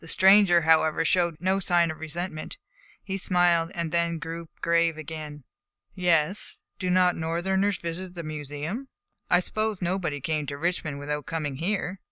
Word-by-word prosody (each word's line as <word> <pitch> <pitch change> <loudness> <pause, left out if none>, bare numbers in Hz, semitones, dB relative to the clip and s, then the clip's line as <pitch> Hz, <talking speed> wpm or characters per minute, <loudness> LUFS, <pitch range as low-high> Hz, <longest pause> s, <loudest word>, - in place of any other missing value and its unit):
The 165 - -12
stranger, 190 -1 +6
however, 160 0 +3
showed 170 -1 +2
no 190 +2 +1
sign 175 -3 +2
of 160 - -10
resentment. 160 - -5 0.5
He 195 -1 -3
smiled, 175 -3 +2
then 170 0 0
grew 165 +1 -6
grave 170 -1 +2
again. 155 -2 -7 0.5
"Yes. 180 0 +1 0.2
Do 185 - -1
not 180 0 +4
Northerners 190 +4 0
visit 175 +2 -5
the 170 - -5
Museum? 155 - -5 0.4
I 175 - +5
supposed 215 +1 -2
nobody 175 -5 -1
came 150 +1 -2
to 140 - -4
Richmond 155 -2 -2
without 150 0 -4
coming 150 -4 -3
here." 190 +2 -2
170 Hz, 150 wpm, -26 LUFS, 155-185 Hz, 0.5 s, stranger